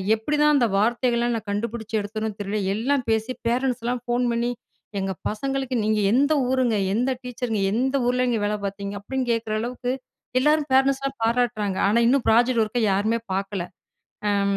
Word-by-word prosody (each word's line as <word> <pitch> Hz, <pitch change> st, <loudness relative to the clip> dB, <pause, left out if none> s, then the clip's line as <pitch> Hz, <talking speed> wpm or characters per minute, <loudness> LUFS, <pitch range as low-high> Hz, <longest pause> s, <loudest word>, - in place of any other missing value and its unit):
எப்டிதான் 300 Hz, +6 st, +2 dB
அந்த 250 Hz, -, +4 dB
வார்த்தைகள்லாம் 235 Hz, +2 st, +1 dB
நான் 215 Hz, -2 st, -8 dB
கண்டுபிடிச்சு 225 Hz, +1 st, -4 dB
எடுத்தனோ 215 Hz, +2 st, -3 dB
தெரியல. 205 Hz, +2 st, -2 dB, 0.2 s
எல்லாம் 260 Hz, +5 st, 0 dB
பேசி 220 Hz, +3 st, 0 dB, 0.2 s
பேரண்ட்ஸ்லாம் 245 Hz, 0 st, 0 dB
ஃபோன் 245 Hz, +1 st, +1 dB
பண்ணி 235 Hz, +1 st, 0 dB, 0.5 s
"எங்க 190 Hz, 0 st, -2 dB, 0.2 s
பசங்களுக்கு 270 Hz, +3 st, -2 dB
நீங்க 215 Hz, 0 st, +1 dB
எந்த 285 Hz, +5 st, +3 dB, 0.2 s
ஊருங்க? 255 Hz, -3 st, +2 dB, 0.2 s
எந்த 250 Hz, +4 st, +1 dB
டீச்சருங்க? 245 Hz, -3 st, -3 dB
எந்த 260 Hz, +4 st, 0 dB
ஊர்லங்க 250 Hz, -2 st, +1 dB
வேலை 210 Hz, 0 st, 0 dB
பார்த்தீங்க?" 200 Hz, 0 st, -4 dB
அப்டின்னு 260 Hz, +5 st, -3 dB
கேக்குற 230 Hz, -2 st, -1 dB
அளவுக்கு 245 Hz, +1 st, -3 dB, 0.5 s
எல்லாரும் 300 Hz, +2 st, +2 dB
பேரன்ட்ஸ்லாம் 270 Hz, 0 st, +2 dB
பாராட்டுறாங்க. 225 Hz, -4 st, 0 dB
ஆனா 225 Hz, +3 st, +3 dB
இன்னும் 270 Hz, 0 st, +2 dB
ப்ராஜெக்ட் 235 Hz, +1 st, +4 dB
ஒர்க்க 225 Hz, +3 st, -2 dB
யாருமே 215 Hz, +4 st, +1 dB
பாக்கல. 195 Hz, -1 st, -2 dB, 0.7 s
அம் 200 Hz, -1 st, +1 dB
235 Hz, 150 wpm, -24 LUFS, 215-255 Hz, 0.7 s, அந்த